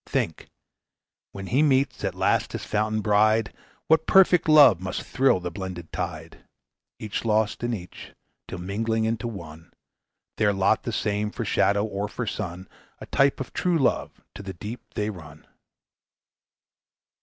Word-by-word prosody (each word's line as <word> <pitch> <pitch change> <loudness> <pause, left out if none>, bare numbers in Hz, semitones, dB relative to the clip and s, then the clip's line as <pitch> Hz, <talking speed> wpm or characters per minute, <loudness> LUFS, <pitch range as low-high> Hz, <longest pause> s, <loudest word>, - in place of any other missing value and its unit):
Think, - - -2 0.8
when 95 0 -8
he 130 +8 +1
meets 140 -2 +2
at - - -2
last - - +1
his - - -5
fountain 110 +1 -1
bride, 110 +1 +2 0.3
What 160 0 +3
perfect 180 -4 +5
love 140 - +7
must 95 -1 -4
thrill 130 -7 +2
the 90 -1 -5
blended 90 -2 -7
tide! - - -5 0.6
Each 105 -2 -4
lost 110 0 0
in 120 - -1
each, 90 -3 -10 0.4
till - - -6
mingling 110 +5 -1
into 115 +1 -2
one, 85 -7 -9 0.7
Their 105 -1 +2
lot 100 +2 +2
the 120 - -4
same 105 -1 -1
for - - -5
shadow 100 +1 +2
or 105 -1 -3
for 115 +3 -5
sun, 95 -4 -5 0.3
A - - -10
type 140 0 +2
of 130 - -6
true 180 -2 +1
love, 135 -5 -1
to - - -9
the 95 -1 -7
deep 105 +7 -7
they 105 +1 -1
run." 80 -5 -13
105 Hz, 155 wpm, -25 LUFS, 95-120 Hz, 0.8 s, love